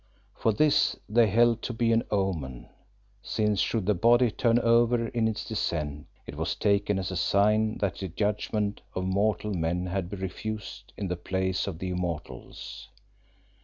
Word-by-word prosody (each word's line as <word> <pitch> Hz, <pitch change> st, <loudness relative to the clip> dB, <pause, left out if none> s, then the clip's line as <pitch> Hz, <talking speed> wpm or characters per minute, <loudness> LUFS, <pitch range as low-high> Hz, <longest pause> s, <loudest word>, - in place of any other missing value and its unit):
For 110 Hz, -, +1 dB
this 145 Hz, +8 st, +3 dB
they 115 Hz, +1 st, +4 dB
held 115 Hz, +2 st, +3 dB
to 125 Hz, -, -4 dB
be 115 Hz, 0 st, +1 dB
an 115 Hz, 0 st, +4 dB
omen, 85 Hz, -, -2 dB, 0.5 s
since 105 Hz, -2 st, 0 dB
should 110 Hz, +3 st, 0 dB
the 105 Hz, -, +3 dB
body 120 Hz, +5 st, +4 dB
turn 115 Hz, +2 st, +2 dB
over 115 Hz, 0 st, +3 dB
in 115 Hz, -2 st, +1 dB
its 110 Hz, -1 st, -3 dB
descent 75 Hz, -9 st, -3 dB, 0.2 s
it -, -, -8 dB
was -, -, -2 dB
taken 100 Hz, -1 st, +1 dB
as 95 Hz, 0 st, -3 dB
a -, -, -4 dB
sign 105 Hz, +4 st, +2 dB
that 100 Hz, -1 st, -1 dB
the 95 Hz, -, -3 dB
judgment 105 Hz, +2 st, -1 dB
of 90 Hz, -, -2 dB
mortal 105 Hz, +2 st, 0 dB
men 85 Hz, +1 st, -1 dB
had 90 Hz, -1 st, -2 dB
been 100 Hz, -1 st, -7 dB
refused 105 Hz, +2 st, -6 dB
in 100 Hz, -, -3 dB
the 90 Hz, -, -1 dB
Place 95 Hz, +2 st, -1 dB
of 95 Hz, -5 st, -4 dB
the 95 Hz, +2 st, -4 dB
Immortals. 90 Hz, -3 st, -5 dB
100 Hz, 165 wpm, -28 LUFS, 95-110 Hz, 0.5 s, they